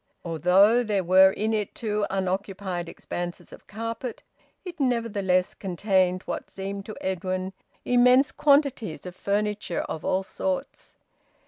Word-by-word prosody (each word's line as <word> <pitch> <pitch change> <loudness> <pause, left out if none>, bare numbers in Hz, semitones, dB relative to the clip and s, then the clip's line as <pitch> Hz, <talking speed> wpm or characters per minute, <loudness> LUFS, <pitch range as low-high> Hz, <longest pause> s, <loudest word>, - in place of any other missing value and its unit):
Although 185 +8 +4
there 205 -4 0
were 190 +2 +7
in 215 +3 -1
it 210 -2 -2
two 210 -2 -1
unoccupied 190 -2 -3
expanses 175 +1 -6
of - - -14
carpet, 230 +3 -5 0.4
it 350 -2 -8
nevertheless 205 -8 +1
contained 185 -1 0
what - - -5
seemed 195 +1 -6
to 215 - -7
Edwin 185 0 -2 0.3
immense 250 +3 +5
quantities 280 - +2
of 180 -1 -8
furniture 205 -2 -1
of 160 - -6
all 190 +1 0
sorts. 275 +7 -4
200 Hz, 125 wpm, -26 LUFS, 185-230 Hz, 0.4 s, were